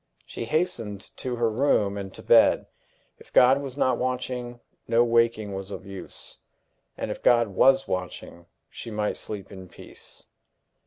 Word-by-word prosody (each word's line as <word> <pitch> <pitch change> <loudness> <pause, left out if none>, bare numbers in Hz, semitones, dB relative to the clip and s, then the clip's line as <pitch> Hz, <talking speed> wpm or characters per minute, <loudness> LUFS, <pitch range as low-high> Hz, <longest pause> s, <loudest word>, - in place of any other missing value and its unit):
She - - -6
hastened 115 - -2 0.2
to 125 -1 -3
her 120 -1 +1
room, 110 -4 +1
and 100 -1 -6
to - - -9
bed. - - +5 0.5
If - - -18
God 130 +3 +6
was 135 -1 -7
not 130 -4 +2
watching, 125 -1 -3 0.3
no 115 +1 +4
waking 115 -3 +1
was 95 0 -6
of 100 -1 -8
use; 95 -1 -10 0.6
and - - -3
if - - -6
God 120 -3 +4
was 135 +7 +4
watching, 90 -1 -5 0.2
she - - -8
might 105 -1 -1
sleep 100 -3 -5
in 95 -2 -10
peace. 85 - -9
115 Hz, 155 wpm, -26 LUFS, 100-125 Hz, 0.6 s, God